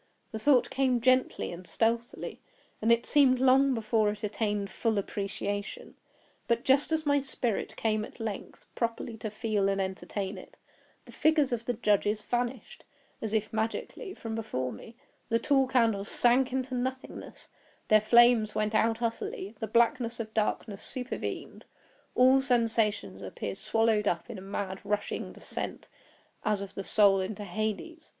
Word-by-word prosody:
The 220 - -4
thought 250 0 +4
came 260 -2 +2
gently 255 +2 +2
and 175 +1 -9
stealthily, 230 +1 -1 0.4
and 225 +2 +3
it 235 0 +3
seemed 265 -3 +4
long 265 +1 +5
before 220 -1 +1
it 210 +1 -5
attained 210 -1 -1
full 225 -2 0
appreciation; 200 0 -4 0.5
but 235 0 +1
just 275 +4 +3
as 315 -1 0
my 285 0 +3
spirit 260 -5 -3
came 215 -1 0
at 220 - -10
length 220 -3 -6
properly 230 0 -2
to 215 - -4
feel 210 -2 0
and 195 0 0
entertain 190 +1 -3
it, - - -15 0.5
the - - -13
figures 305 -3 +2
of 235 -1 -2
the 245 - 0
judges 210 -1 +2
vanished, 245 - -3 0.4
as 220 - -3
if 215 0 -1
magically, 225 - -3
from 225 -1 -6
before 130 - -3
me; 225 - -12 0.3
the 230 - +3
tall 270 +2 +2
candles 225 -6 +2
sank 250 +2 +3
into 260 0 -2
nothingness; 260 +1 -5 0.4
their 215 0 +6
flames 235 -1 +5
went 215 0 0
out 225 +1 +2
utterly; 225 -3 -3
the 220 - -3
blackness 235 +1 +2
of 220 -1 -5
darkness 210 -1 -1
supervened; 255 0 -4 0.5
all 260 +2 +6
sensations 230 -4 0
appeared - - -5
swallowed 225 -2 +2
up 175 +7 -1
in 210 - -7
a - - -10
mad 195 0 -4
rushing 205 0 -2
descent - - -6 0.6
as 210 -1 +1
of 200 0 -7
the 195 - -5
soul 200 -1 +4
into 200 +2 -4
Hades. 215 - -4
225 Hz, 155 wpm, -29 LUFS, 210-250 Hz, 0.6 s, their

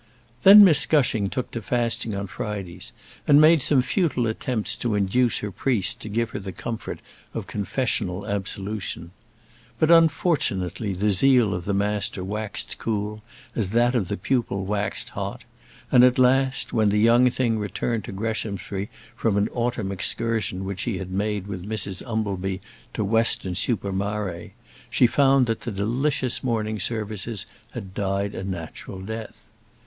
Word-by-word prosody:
Then 205 +2 +10
Miss 160 -6 +5
Gushing 120 -9 +2
took 130 - -4
to 115 - -4
fasting 115 -1 -1
on 100 0 -3
Fridays, 95 +2 -6 0.4
and 145 -1 +7
made 155 0 +6
some 130 -1 +3
futile 130 -3 0
attempts 115 0 -1
to 120 -2 -1
induce 105 +5 +2
her 105 - -4
priest 105 -2 0
to 110 - -7
give 115 +2 -1
her - - -4
the 95 -1 -6
comfort 115 +4 -6 0.3
of - - -3
confessional 100 -3 -2
absolution. 100 -4 -4 0.7
But, 155 +6 +3
unfortunately, 135 - +2
the 105 +3 +1
zeal 120 +1 +4
of 90 0 -4
the 100 - 0
master 100 -1 -1
waxed 105 +2 -4
cool 105 -1 -3 0.3
as 105 -5 -1
that 120 +1 +3
of 115 -8 0
the - - -3
pupil 100 -2 -1
waxed 105 +1 -2
hot; - - -5 0.5
and, 125 - +7
at 125 0 +5
last, 130 +1 +2
when 110 -3 +3
the 105 - +1
young 120 +4 +5
thing 120 -3 0
returned 110 +2 -2
to - - -7
Greshamsbury 100 -1 -3 0.3
from 110 -3 0
an 100 +2 +1
autumn 120 -4 -2
excursion 100 -1 -1
which 95 0 -5
she 115 -6 -1
had 95 0 -6
made 100 0 -1
with 95 -3 -6
Mrs 100 -3 -3
Umbleby 95 -4 -2 0.4
to - - 0
Weston 110 -3 +2
super 100 +1 -1
Mare, 100 -3 -3 0.4
she - - +4
found 135 +1 +4
that 115 -1 -2
the 120 - -4
delicious 125 +5 -1
morning 110 -3 -1
services 105 0 -3 0.3
had 95 -1 -7
died 100 0 -1
a - - -5
natural 95 0 -6
death. 110 +2 -8
105 Hz, 155 wpm, -24 LUFS, 100-120 Hz, 0.7 s, Then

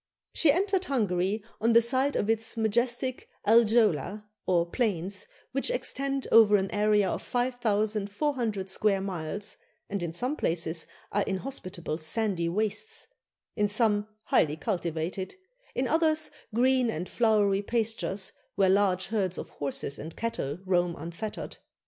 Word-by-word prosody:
She 315 - +5
entered 380 +3 +1
Hungary 205 - 0 0.2
on 230 +1 +3
the 230 - +8
side 260 +4 +2
of 205 - 0
its 225 +1 +1
majestic 240 +3 0 0.2
Aljöla, 215 -3 +4 0.2
or 175 -2 +3
plains, 200 -2 -1 0.2
which 275 - 0
extend 275 - -1
over 220 -2 +7
an 195 -1 +1
area 210 -1 +3
of - - -2
5,400 220 -1 -1
square 200 -1 +2
miles, 190 +1 -3 0.3
and 200 -2 -1
in 170 -2 -2
some 250 - -2
places 165 - -2 0.2
are 205 - +1
inhospitable 185 - -4
sandy 170 +1 0
wastes; 215 - -1 0.5
in 210 -2 +1
some, 210 -1 +2 0.2
highly 150 0 +2
cultivated; 175 - -3 0.4
in 255 +1 +1
others, 315 0 +2 0.2
green 250 +2 +3
and 180 -3 -3
flowery 210 -4 +2
pastures, 220 -3 -1 0.2
where 195 -1 +4
large 190 -2 +3
herds 195 -5 0
of - - -6
horses 140 0 -4
and 160 +2 -7
cattle 170 -11 -3
roam 175 -2 +1
unfettered. 170 +7 -6
210 Hz, 130 wpm, -28 LUFS, 185-235 Hz, 0.5 s, the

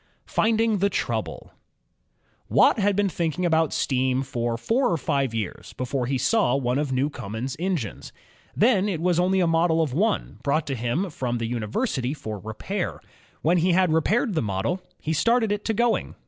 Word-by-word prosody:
PAPIN*S - - -37
ENGINE - - -23
Finding 225 -1 +2
the 200 +2 +2
Trouble - - -3 1.0
Watt - - +4
had 205 -1 +2
been 205 0 +2
thinking 170 -1 -1
about 160 -2 +2
steam 130 0 0
for 120 -3 -2
four 245 - +1
or 170 - +1
five 140 -4 0
years 105 -5 -5
before 130 0 -2
he 135 +1 0
saw 205 - +2
one 130 -1 0
of 145 -2 -1
Newcomen's 130 -2 -2
engines. 175 - -3 0.4
Then 210 -3 +3
it 175 -5 -2
was 175 0 +1
only 185 +1 +2
a - - +3
model 165 0 +2
of 155 -6 0
one, 210 +8 0
brought 145 +2 0
to 135 - -3
him 125 - -1
from 125 -4 -2
the 115 - -2
uni 115 -2 -3
versity 135 - -1
for 110 -5 -6
repair. 110 - -4 0.4
When 170 +3 +3
he 175 +2 +2
had 180 -2 +3
repaired 210 - +1
the 160 - +1
model, 110 - -2 0.2
he 160 - -2
started 230 +6 +2
it 205 0 -1
to 225 - +1
going. 235 +1 0
160 Hz, 190 wpm, -25 LUFS, 125-195 Hz, 1.0 s, Watt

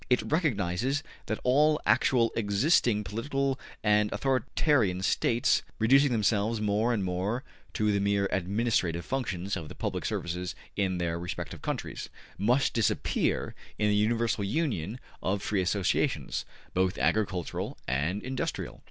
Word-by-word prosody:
It 125 - +3
recognizes 135 - +1 0.2
that 110 - -2
all 150 +4 +4
actually 120 -3 +3
existing 110 - +2
political 135 +6 -1 0.2
and 105 -1 +3
authoritarian 130 - +1
States, 115 +4 +2 0.2
reducing 135 +5 +5
themselves 110 0 +1
more 105 +3 +1
and 110 -5 0
more 95 +7 -1 0.3
to 105 -1 +1
the 100 - +1
mere 100 0 +2
administrative 95 -3 0
functions 100 -8 -2
of 75 - -6
the - - -9
public - - -3
services 90 +1 -3 0.2
in 95 -3 0
their 85 -1 -1
respective 90 0 -5
countries, - - -4 0.3
must 125 +7 +2
disappear 115 -3 0 0.2
in 105 0 +2
the 105 - +3
universal 115 0 +1
union 110 - -1 0.2
of 100 +1 -1
free 100 -3 +1
associations, 95 +1 0 0.3
both 95 0 +1
agricultural 95 -5 -1
and 75 +10 -1
industrial. 130 +1 -3
105 Hz, 130 wpm, -29 LUFS, 95-125 Hz, 0.3 s, reducing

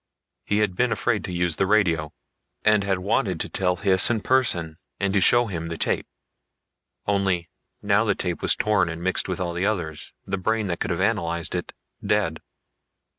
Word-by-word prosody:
He 105 - 0
had 95 -3 -9
been 125 +4 +1
afraid 115 -2 0
to - - -6
use 90 -2 0
the 95 - +1
radio, 85 -7 +2 0.5
and 105 -1 +4
had 95 -1 0
wanted 90 -1 0
to - - -2
tell 90 -1 0
Hys 95 -1 +4
in 115 -3 0
person, 90 -12 +1 0.2
and 100 -1 0
to 100 - +3
show 120 +5 +5
him 85 -6 -4
the 85 0 -5
tape. - - -1 1.0
Only 95 -4 0 0.3
now 100 +1 +3
the 105 -3 +1
tape 90 -4 -3
was - - +4
torn 105 -5 +1
and 85 +1 -6
mixed 95 +1 0
with 95 0 -3
all 90 -2 -2
the 90 +3 0
others, 85 -8 -3
the 95 -1 -3
brain 110 +3 0
that 85 -3 -3
could - - -2
have 85 - -1
analyzed 85 -5 -1
it - - -3 0.3
dead. 100 -6 0
95 Hz, 190 wpm, -24 LUFS, 85-105 Hz, 1.0 s, show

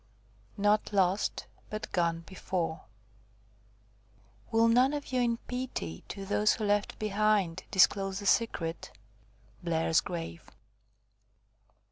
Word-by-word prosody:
NOT 205 +1 +2
LOST, 190 0 +1 0.2
BUT 215 0 -5
GONE 170 -2 +1
BEFORE 175 -2 -4 1.6
"—Will 225 0 +4
none 250 +4 +4
of 290 -2 -5
you 255 - +2
in 235 -1 +1
pity 250 - -5
To 195 -1 -6
those 210 +3 +2
you 215 - -1
left 205 0 0
behind, 210 -4 +1
disclose 195 0 +3
the 200 - -6
secret?" 170 -7 0 0.7
BLAIR'S 165 -1 +2
GRAVE. 170 -1 -6
200 Hz, 105 wpm, -30 LUFS, 170-215 Hz, 1.6 s, Will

